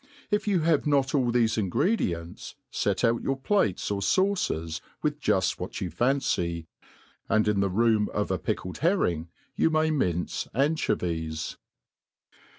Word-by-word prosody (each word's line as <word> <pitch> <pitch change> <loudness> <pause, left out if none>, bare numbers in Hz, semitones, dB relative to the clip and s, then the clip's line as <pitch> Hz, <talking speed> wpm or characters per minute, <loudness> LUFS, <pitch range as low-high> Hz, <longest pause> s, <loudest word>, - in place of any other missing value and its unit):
If 210 +1 +1
you 190 -5 +2
have 155 -2 +2
not 140 -2 +2
all 130 -4 +2
thefe 115 -2 +2
ingredients, 90 - -1 0.2
fet - - 0
out 115 0 +3
your 135 0 -1
plates 135 - 0
or 100 -1 -1
faucers 100 - 0 0.2
with 150 -1 0
juft 95 -8 +1
what 90 - -5
you 90 -5 -3
fancy, 90 - 0 0.6
and 110 0 +3
in 105 -2 +2
the 100 0 +2
room 110 +1 +2
of - - -1
a - - 0
pickled 90 - -3
herring 90 - +1 0.3
you - - +3
may 155 0 +2
mince 90 - -1
anchoyies. 85 - -1
115 Hz, 145 wpm, -27 LUFS, 90-150 Hz, 0.6 s, out